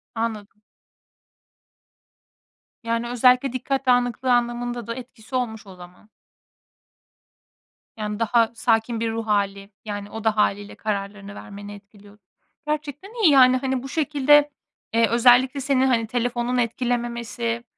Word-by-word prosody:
Anladım. 215 Hz, -2 st, -4 dB, 2.2 s
Yani, 230 Hz, +1 st, -1 dB
özellikle 250 Hz, +1 st, +3 dB
dikkat 270 Hz, +1 st, -2 dB
dağınıklığı 245 Hz, 0 st, +2 dB
anlamında 240 Hz, -1 st, -1 dB
da 230 Hz, -, -4 dB
etkisi 245 Hz, -1 st, -10 dB
olmuş 220 Hz, -5 st, -3 dB
o 190 Hz, -, -11 dB
zaman. 180 Hz, +3 st, -15 dB, 1.9 s
Yani, 210 Hz, -1 st, -4 dB
daha 230 Hz, 0 st, +2 dB
sakin 225 Hz, 0 st, +1 dB
bir 225 Hz, -1 st, -1 dB
ruh 225 Hz, 0 st, -4 dB
hâli, 200 Hz, -1 st, -1 dB, 0.2 s
yani, 205 Hz, -1 st, -5 dB
o 225 Hz, 0 st, -7 dB
da 220 Hz, -1 st, +1 dB
hâliyle 205 Hz, 0 st, 0 dB
kararlarını 200 Hz, -1 st, -5 dB
vermeni 205 Hz, 0 st, -9 dB
etkiliyod 205 Hz, 0 st, -17 dB, 0.5 s
Gerçekten 305 Hz, -, -4 dB
iyi, 320 Hz, -, +7 dB
yani. 255 Hz, -2 st, +6 dB
Hani, 260 Hz, -1 st, -2 dB
bu 270 Hz, -, -7 dB
şekilde, 295 Hz, -1 st, +3 dB, 0.4 s
eee, 230 Hz, 0 st, +4 dB
özellikle 250 Hz, +3 st, +4 dB
seni, 265 Hz, -1 st, +2 dB
hani, 235 Hz, -4 st, +1 dB
telefonun 245 Hz, +1 st, -1 dB
etkilememesi, 235 Hz, -1 st, -2 dB
235 Hz, 120 wpm, -23 LUFS, 215-255 Hz, 2.2 s, iyi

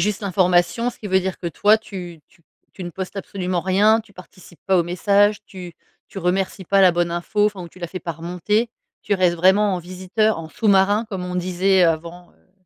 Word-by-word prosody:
juste 205 Hz, +3 st, -1 dB
l'information, 185 Hz, +4 st, +1 dB
ce 245 Hz, -, -18 dB
qui 210 Hz, -, -7 dB
veut 190 Hz, -1 st, +2 dB
dire 190 Hz, 0 st, -4 dB
que 175 Hz, -, -6 dB
toi 205 Hz, +7 st, +3 dB
tu 180 Hz, -6 st, -9 dB
tu 170 Hz, -, -28 dB, 0.3 s
tu 190 Hz, -, -9 dB
ne 175 Hz, -, -6 dB
postes 190 Hz, +2 st, -6 dB
absolument 185 Hz, -2 st, -3 dB
rien, 205 Hz, +5 st, +3 dB
tu 215 Hz, -2 st, -20 dB
participes 180 Hz, -1 st, -15 dB
pas 190 Hz, -1 st, +3 dB
aux 175 Hz, -, +4 dB
messages? 200 Hz, +4 st, +2 dB
Tu 180 Hz, -3 st, -10 dB, 0.4 s
tu 195 Hz, -, -8 dB
remercies 190 Hz, +1 st, -1 dB
pas 195 Hz, +3 st, +2 dB
la 185 Hz, -2 st, +7 dB
bonne 175 Hz, 0 st, -1 dB
info, 205 Hz, +5 st, 0 dB
enfin 205 Hz, -3 st, -4 dB
ou 170 Hz, -, -9 dB
tu 185 Hz, -, -18 dB
la 175 Hz, -, -4 dB
fais 185 Hz, +2 st, -7 dB
pas 170 Hz, -, -5 dB
remonter? 180 Hz, +8 st, -1 dB, 0.3 s
Tu 205 Hz, -, 0 dB
restes 180 Hz, -3 st, +2 dB
vraiment 190 Hz, +3 st, +3 dB
en -, -, -2 dB
visiteur, 185 Hz, +5 st, -1 dB
en 160 Hz, -, -9 dB
sous-marin 205 Hz, +4 st, +2 dB
comme 190 Hz, -4 st, -5 dB
on 180 Hz, 0 st, -4 dB
disait 185 Hz, +1 st, +2 dB
avant, 170 Hz, +2 st, -2 dB
heu,. 185 Hz, -, -34 dB
185 Hz, 220 wpm, -21 LUFS, 175-205 Hz, 0.4 s, la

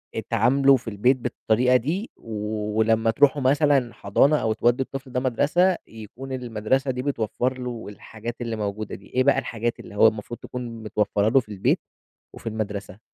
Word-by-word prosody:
اتعاملوا 125 Hz, +5 st, +3 dB
في 125 Hz, -2 st, -7 dB
البيت 115 Hz, +6 st, +2 dB
بالطريقة 120 Hz, 0 st, +1 dB
دي، 160 Hz, -, -1 dB
ولمّا 110 Hz, +1 st, 0 dB
تروحوا 140 Hz, +3 st, +3 dB
مثلًا 135 Hz, -2 st, +3 dB
حضانة 140 Hz, +9 st, +3 dB
أو 110 Hz, -4 st, 0 dB
تودوا 120 Hz, +4 st, +2 dB
الطفل 135 Hz, -1 st, -8 dB
ده 125 Hz, -, 0 dB
مدرسة، 150 Hz, +9 st, +2 dB
يكون 115 Hz, +5 st, -10 dB
المدرسة 125 Hz, +1 st, -1 dB
دي 125 Hz, 0 st, -4 dB
بتوفّر 130 Hz, -1 st, -1 dB
له 125 Hz, -2 st, -5 dB
الحاجات 110 Hz, +3 st, -8 dB
اللي 115 Hz, -1 st, -2 dB
موجودة 105 Hz, 0 st, -4 dB
دي، 100 Hz, -, -14 dB
إيه 130 Hz, +1 st, +1 dB
بقى 140 Hz, 0 st, +4 dB
الحاجات 115 Hz, +1 st, -3 dB
اللي -, -, -11 dB
هو 110 Hz, -, +7 dB
المفروض 110 Hz, +2 st, -3 dB
تكون 120 Hz, -3 st, -7 dB
متوفّرّة 105 Hz, -1 st, +1 dB
له 135 Hz, -, +5 dB
في 110 Hz, -4 st, -8 dB
البيت 100 Hz, -2 st, +1 dB, 0.5 s
وفي -, -, -10 dB
المدرسة؟ 105 Hz, -2 st, -5 dB
120 Hz, 165 wpm, -24 LUFS, 110-130 Hz, 0.5 s, هو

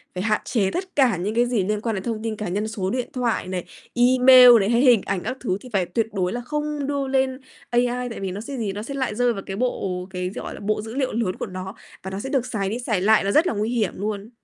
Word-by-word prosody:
phải 180 Hz, -, -2 dB
hạn 215 Hz, -1 st, +1 dB
chế 200 Hz, -6 st, 0 dB
tất 370 Hz, 0 st, -5 dB
cả 255 Hz, -10 st, +3 dB
những 205 Hz, +5 st, -3 dB
cái 240 Hz, +1 st, +4 dB
gì 235 Hz, -6 st, 0 dB
liên 210 Hz, 0 st, -1 dB
quan 225 Hz, -2 st, -1 dB
đến 190 Hz, -, -4 dB
thông 225 Hz, -2 st, -3 dB
tin 225 Hz, -1 st, -2 dB
cá 210 Hz, -3 st, -5 dB
nhân, 205 Hz, +4 st, -2 dB
số 195 Hz, -4 st, -3 dB
điện 250 Hz, +2 st, -2 dB
thoại 240 Hz, -7 st, -1 dB
này, 185 Hz, -1 st, -3 dB, 0.3 s
email 250 Hz, +1 st, +7 dB
này 195 Hz, +2 st, +1 dB
hay 235 Hz, +1 st, +3 dB
hình 245 Hz, -7 st, +6 dB
ảnh 190 Hz, -3 st, -2 dB
các 260 Hz, -, -4 dB
thứ 190 Hz, -6 st, -1 dB
thì 255 Hz, -, -11 dB
phải 185 Hz, -3 st, +2 dB
tuyệt 215 Hz, +5 st, -1 dB
đối 185 Hz, 0 st, -1 dB
là 245 Hz, -, -3 dB
không 300 Hz, +1 st, -3 dB
đưa 280 Hz, -2 st, -1 dB
lên 265 Hz, -1 st, 0 dB, 0.3 s
AI, 245 Hz, +1 st, 0 dB
tại 230 Hz, -, -7 dB
vì 190 Hz, -2 st, -3 dB
nó 200 Hz, +3 st, -5 dB
sẽ 270 Hz, +3 st, -6 dB
gì, 205 Hz, -4 st, -2 dB
nó 205 Hz, -, -5 dB
sẽ 275 Hz, -, -6 dB
lại 260 Hz, -6 st, -2 dB
rơi 245 Hz, 0 st, +2 dB
vào 195 Hz, -, -6 dB
cái 195 Hz, -, -5 dB
bộ 190 Hz, -6 st, -2 dB
cái, 180 Hz, -1 st, -3 dB
gọi -, -, -6 dB
là, -, -, -9 dB
bộ 210 Hz, +1 st, -1 dB
dữ 225 Hz, +3 st, -8 dB
liệu 265 Hz, -2 st, -1 dB
lớn 215 Hz, -5 st, -1 dB
của -, -, -4 dB
nó 185 Hz, +2 st, -7 dB, 0.3 s
và 190 Hz, -, -6 dB
nó 195 Hz, -, -4 dB
sẽ 265 Hz, -, -5 dB
được 265 Hz, -3 st, 0 dB
xài 195 Hz, -5 st, -2 dB
đi 235 Hz, +4 st, -3 dB
xài 215 Hz, -6 st, -1 dB
lại 215 Hz, 0 st, +4 dB
nó 200 Hz, -, 0 dB
rất 320 Hz, -, +4 dB
là -, -, 0 dB
nguy 215 Hz, +1 st, -1 dB
hiểm 225 Hz, -6 st, 0 dB
luôn. 205 Hz, +1 st, -4 dB
225 Hz, 290 wpm, -23 LUFS, 195-250 Hz, 0.3 s, email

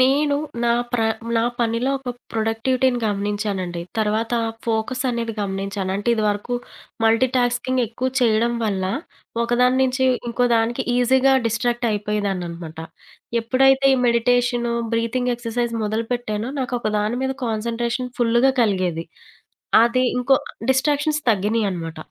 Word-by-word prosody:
నేను 285 Hz, +3 st, +3 dB, 0.3 s
నా 235 Hz, -, +3 dB, 0.2 s
ప్ర 245 Hz, -, +1 dB, 0.4 s
నా 225 Hz, -, +3 dB, 0.2 s
పనిలో 235 Hz, +3 st, +1 dB
ఒక 260 Hz, -2 st, -5 dB, 0.2 s
ప్రొడక్టివిటీని 240 Hz, +3 st, +1 dB
గమనించానండి. 200 Hz, -3 st, -2 dB, 0.2 s
తర్వాత 220 Hz, +2 st, 0 dB, 0.3 s
ఫోకస్ 230 Hz, +3 st, -1 dB
అనేవి 235 Hz, -1 st, -2 dB
గమనించాను. 195 Hz, -1 st, -3 dB
అంటే 205 Hz, +4 st, -3 dB
ఇది 220 Hz, -, -1 dB
వరకు 205 Hz, +4 st, -2 dB, 0.5 s
మల్టీటాస్కింగ్ 245 Hz, +2 st, +2 dB
ఎక్కువ 245 Hz, +4 st, -2 dB
చేయడం 235 Hz, 0 st, +3 dB
వల్ల 195 Hz, -3 st, -1 dB, 0.6 s
ఒకదాని 250 Hz, +2 st, +2 dB
నుంచి 260 Hz, 0 st, +1 dB, 0.2 s
ఇంకోదానికి 235 Hz, +1 st, +1 dB
ఈజీగా 260 Hz, +2 st, +4 dB
డిస్ట్రాక్ట్ 240 Hz, +1 st, 0 dB
అయిపోయేదాన్ననమాట. 190 Hz, -6 st, -3 dB, 0.6 s
ఎప్పుడైతే 270 Hz, +3 st, +3 dB
ఈ -, -, 0 dB
మెడిటేషను, 240 Hz, 0 st, +2 dB, 0.2 s
బ్రీతింగ్ 245 Hz, +2 st, 0 dB
ఎక్సర్సైజ్ 235 Hz, 0 st, -2 dB
మొదలుపెట్టానో 225 Hz, +1 st, -2 dB
నాకొక 245 Hz, -3 st, -2 dB
దాని 215 Hz, +4 st, -1 dB
మీద 265 Hz, -, 0 dB
కాన్సంట్రేషన్ 235 Hz, +3 st, -2 dB
ఫుల్లుగా 240 Hz, +2 st, +3 dB
కలిగేది. 185 Hz, -6 st, 0 dB, 0.8 s
అది 245 Hz, +2 st, +2 dB
ఇంకో 250 Hz, +2 st, +4 dB, 0.4 s
డిస్ట్రాక్షన్స్ 295 Hz, +3 st, +1 dB
తగ్గినయనమాట. 195 Hz, -6 st, -1 dB
235 Hz, 110 wpm, -22 LUFS, 210-250 Hz, 0.8 s, ఈజీగా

